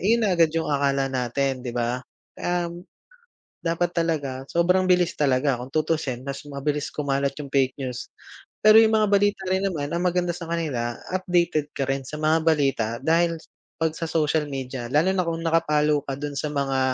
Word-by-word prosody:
iyon 225 +3 +3
na 195 - +2
agad 165 -2 +5
yung 160 - +1
akala 140 -1 +1
natin, 130 +1 -1
'di 120 - -4
ba? 120 +1 -1 0.4
Um, 175 0 -2 0.8
dapat 170 +1 0
talaga, 150 -6 -1
sobrang 180 +2 +3
bilis 180 -1 +3
talaga 135 -2 +2
kung 130 - -8
tutusin, 155 -5 -1
mas 140 0 -5
mabilis 145 +1 -2
kumalat 140 -1 0
yung 140 -2 -9
fake 130 -2 +2
news. 125 -2 -5 0.6
Pero 215 +1 +8
yung 220 0 +4
mga 215 -1 +4
balita 205 0 +2
rin 190 +1 +2
naman 155 -7 -2
ang 170 - 0
maganda 180 0 +1
sa 170 - -7
kanila, 130 -9 -2 0.2
updated 175 -5 +1
ka 135 - 0
rin 135 0 0
sa 150 - -7
mga 155 +1 +3
balita, 140 -8 +2 0.2
dahil 165 +1 +3 0.5
'pag 160 -1 +1
sa 165 - -3
social 155 -1 +1
media, 130 -3 -5
lalo 160 +7 +3
na 185 - +1
kung 165 0 -2
naka-follow 150 -2 +2
ka 135 - -2
dun 145 -1 -4
sa 150 - -1
mga, 135 -2 0
150 Hz, 180 wpm, -24 LUFS, 135-170 Hz, 0.8 s, Pero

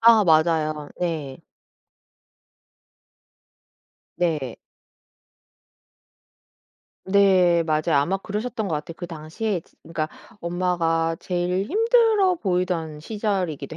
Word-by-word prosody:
아 225 -2 +7
맞아요. 155 -2 +2
네. 155 -6 -3 2.8
네. 155 -8 -1 2.5
네. 190 -3 +4
맞아요. 155 0 +1
아마 145 +7 +2
그러셨던 215 +3 -4
것 165 - -1
같아요. 150 +3 -7
그 175 - -6
당시에 175 +5 -3
지 - - -29
그러니까 160 -2 -3 0.3
엄마가 170 -2 0
제일 180 +2 -1
힘들어 445 - +3
보이던 180 - -1
시절이기도 180 -7 -3
175 Hz, 195 characters per minute, -24 LUFS, 160-200 Hz, 2.8 s, 아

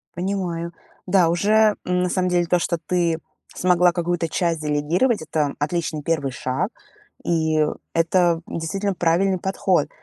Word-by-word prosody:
Понимаю. 175 -2 -3 0.3
Да, 180 -3 +4
уже, 210 +5 +3
м, 180 0 0
на 180 - +1
самом 185 0 0
деле 175 -1 +1
то, 180 +1 +2
что 170 -1 -1
ты 170 -1 0 0.4
смогла 180 -1 +3
какую-то 175 -1 -1
часть 170 -3 -1
делегировать, 155 - +1
это 150 -2 -1
отличный 155 0 -2
1 145 -4 -1
шаг, 135 - -2 0.5
и 160 -2 +2 0.3
это 170 0 +2
действительно 195 +5 -2
правильный 180 +3 +2
подход. 190 -3 0
175 Hz, 140 wpm, -22 LUFS, 160-185 Hz, 0.5 s, Да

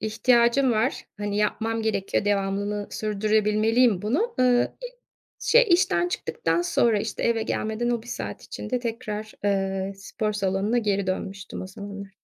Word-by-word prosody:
ihtiyacım 235 +3 +3
var, 225 +6 0
hani, 205 0 -2
yapmam 225 +2 0
gerekiyor 205 -2 0
devamını 205 +1 -1
sürdürebilmeliyim 215 +1 +2
bunu. 355 - 0
Iıı, 250 -1 +4 0.2
i - - -1 0.5
şey - - +5
işten 175 - +3
çıktıktan 165 0 -1
sonra, 220 +4 +2
işte, 215 +1 -4
eve 230 -1 +2
gelmeden 220 +2 -1
o 235 -2 -1
1 - - -16
saat - - -5
içinde 250 - -4
tekrar, 220 -2 -4
eee, 195 -1 0
spor 210 +2 -3
salonuna 200 +3 0
geri 200 -3 0
dönmüştüm 190 +1 -4
o - - -6
zamanlar. 200 0 -8
215 Hz, 140 wpm, -25 LUFS, 200-235 Hz, 0.5 s, şey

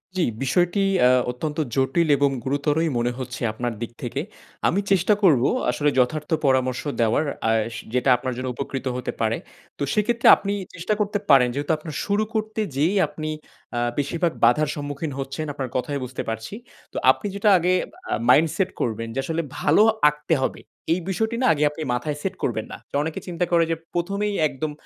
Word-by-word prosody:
জ্বি, 185 - +2 0.2
বিষয়টি 175 +8 +2 0.2
অ্যা 125 - +6 0.2
অত্যন্ত 150 +5 -5 0.2
জটিল 135 +5 +2
এবং 140 +1 +3
গুরুতরই 145 +4 0
মনে 120 +1 +1
হচ্ছে 130 -1 -6
আপনার 120 +2 -3
দিক 115 - -4
থেকে। 125 +3 -2 0.5
আমি 190 - +2
চেষ্টা 195 +2 +4
করবো 140 -9 +5 0.2
আসলে 135 +4 +1
যথার্থ 150 +4 0 0.2
পরামর্শ 130 -2 +2 0.2
দেওয়ার 115 +7 +2 0.2
আর 115 0 +3 0.2
সে - - -7
যেটা 125 +1 +2
আপনার 130 +1 -3
জন্য 130 0 -3
উপকৃত 135 0 -4
হতে 125 - -3
পারে। - - +1 0.4
তো - - -2
সেক্ষেত্রে 235 +3 +2
আপনি 200 0 -3 0.2
চেষ্টা 170 +5 -1
করতে 205 0 0
পারেন 135 -3 +7
যেহেতু 145 +4 -2
আপনার 155 -1 -8
শুরু 205 +1 +1
করতে 215 0 -2 0.2
যেয়েই 165 +9 +2
আপনি 155 +1 -6 0.5
আ - - +1 0.2
বেশিরভাগ 165 +4 0
বাধার 140 +6 +3
সম্মুখীন 145 +1 -4
হচ্ছেন 135 +3 -4
আপনার 135 -2 -4
কথায় 140 +3 -2
বুঝতে 125 0 -5
পারছি। 110 - -5 0.4
তো - - -5
আপনি 210 - -4
যেটা 200 +1 +2
আগে 180 +1 +2 0.4
আ - - +2 0.2
মাইন্ড 155 +6 +6
সেট 190 -1 +1
করবেন 115 -1 -2
যে 135 - -2
আসলে 165 +2 -1 0.2
ভালো 150 +7 +4 0.3
আঁকতে 150 +2 -2
হবে, 130 - -1 0.3
এই 175 - 0
বিষয়টি 220 +4 -1
না - - +2
আগে 150 -1 0
আপনি 150 - -8
মাথায় 145 +4 -2
সেট 195 +2 -3
করবেন 110 -3 -1
না। - - -6 0.3
অনেকে 160 0 -4
চিন্তা 175 0 -1
করে 170 -1 +5
যে - - +2 0.2
১ম 175 +3 -2
এই 205 - -2
একদম 150 +2 -4
150 Hz, 185 wpm, -23 LUFS, 130-175 Hz, 0.5 s, পারেন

